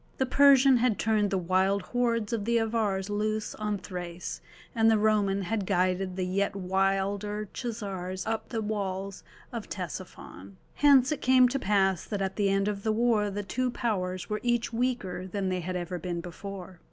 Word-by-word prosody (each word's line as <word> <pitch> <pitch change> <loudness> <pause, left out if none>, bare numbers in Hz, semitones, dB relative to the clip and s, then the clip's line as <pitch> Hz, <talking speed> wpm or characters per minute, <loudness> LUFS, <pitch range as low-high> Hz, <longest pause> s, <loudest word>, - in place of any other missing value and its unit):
The 265 - +1
Persian 270 -1 +6
had 235 -3 +2
turned 215 -2 +1
the 195 - 0
wild 185 +2 +1
hordes 235 -2 0
of 215 -3 -2
the 235 +1 +2
Avars 215 -4 0
loose 215 +1 -2
on 210 -1 -2
Thrace, 180 -2 -6 0.3
and 225 -2 +4
the 220 - +4
Roman 205 -2 +2
had 205 0 -2
guided 185 +1 0
the 185 -1 -1
yet 200 +2 0
wilder 195 +2 -1
Chazars 195 -6 -4
up 220 0 -2
to 245 - -7
the 225 - 0
walls 195 -2 -3 0.3
of - - -5
Ctesiphon. 95 +2 -7 0.2
Hence 280 -2 +5
it 300 - -2
came 255 0 +6
to 275 +2 -1
pass 195 -4 +2
that 205 - -3
at 190 -1 -2
the 200 -2 +1
end 195 +1 +1
of 205 -1 -2
the 220 - 0
war 220 -2 +2
the 205 +1 -4
two 255 +5 -1
powers 185 -7 -2
were 210 0 -2
each 240 -1 0
weaker 225 -7 -2
than 190 0 -2
they 185 0 -1
had 180 +1 -4
ever 180 0 -3
been 175 0 -3
before. 185 +1 -8
205 Hz, 185 wpm, -28 LUFS, 190-225 Hz, 0.3 s, Persian